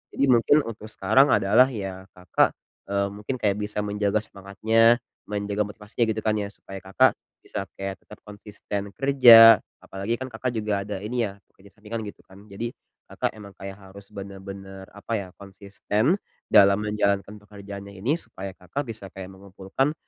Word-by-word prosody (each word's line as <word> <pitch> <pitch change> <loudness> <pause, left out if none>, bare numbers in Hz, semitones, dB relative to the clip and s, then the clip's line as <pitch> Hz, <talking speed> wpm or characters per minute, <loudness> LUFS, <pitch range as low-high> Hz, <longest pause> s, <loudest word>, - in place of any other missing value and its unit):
Jadi - - 0
mungkin 135 +5 +4
untuk 110 -1 -8
sekarang 110 +7 +3
adalah 110 +6 +5
ya 95 -6 -6
Kakak, 90 -3 +1 0.3
eee, 100 0 0
mungkin 105 +6 -5
kayak 105 -4 0
bisa 105 0 0
menjaga 105 +1 0
semangatnya, 110 +4 +2 0.3
menjaga 105 0 -2
motivasinya 105 +3 -3
gitu 110 0 -2
kan 110 -1 +1
ya. 100 - -3
Supaya 95 -1 -11
kakak 95 +1 +3 0.3
bisa 100 - -3
kayak 95 0 -5
tetap 105 - -15
konsisten 105 -1 -7
kerja, 120 -5 +8 0.2
apalagi 100 +4 -3
kan 130 +1 -7
Kakak 120 +2 -3
juga 105 -2 -1
ada 100 -2 -4
ini 120 +2 -1
ya 100 - -10 0.2
kerja 100 +1 -19
sampingan 110 +2 -6
gitu 100 - -10
kan, 100 +2 -17
jadi 115 +4 -5 0.3
Kakak - - -3
emang 100 -2 -11
kayak 95 0 -9
harus 100 0 -14
benar-benar, 95 -1 -9
apa 100 +3 -7
ya, 100 -4 -2
konsisten 100 - -1 0.3
dalam 100 +1 +6
menjalankan 105 -1 -1
pekerjaannya 100 -1 -10
ini 140 - +1
supaya 100 - -6
Kakak 90 +10 -5
bisa 100 -4 -2
kayak 95 -1 -8
mengumpulkan 95 +8 -3
105 Hz, 160 wpm, -25 LUFS, 100-110 Hz, 0.3 s, kerja